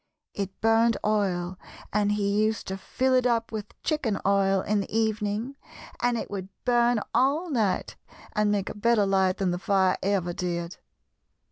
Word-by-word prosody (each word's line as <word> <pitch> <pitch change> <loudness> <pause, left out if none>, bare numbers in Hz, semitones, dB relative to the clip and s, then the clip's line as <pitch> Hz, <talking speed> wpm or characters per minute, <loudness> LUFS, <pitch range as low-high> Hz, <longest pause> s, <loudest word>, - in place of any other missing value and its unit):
It 195 -1 -5
burned 225 +1 +4
oil, 185 -4 0 0.3
and 205 0 +2
he 205 0 +1
used 220 0 -1
to 190 - -2
fill 260 +6 0
it 255 -1 +4
up 230 -2 0
with 215 -2 -7
chicken 280 -10 0
oil 195 -1 +3
in 210 +1 0
the - - -7
evening 220 +3 -1 0.4
and 245 -1 +2
it - - -5
would 190 -2 -5 0.2
burn 240 -2 +3
all 300 +7 +2
night 220 -8 0 0.4
and 210 0 +2
make 200 -2 -1
a - - -6
better 215 0 +3
light 190 -1 +2
than 190 -2 0
the 175 - -2
fire 190 -2 +2
ever 190 -3 0
did. 170 -1 -3
210 Hz, 165 wpm, -26 LUFS, 195-230 Hz, 0.4 s, burned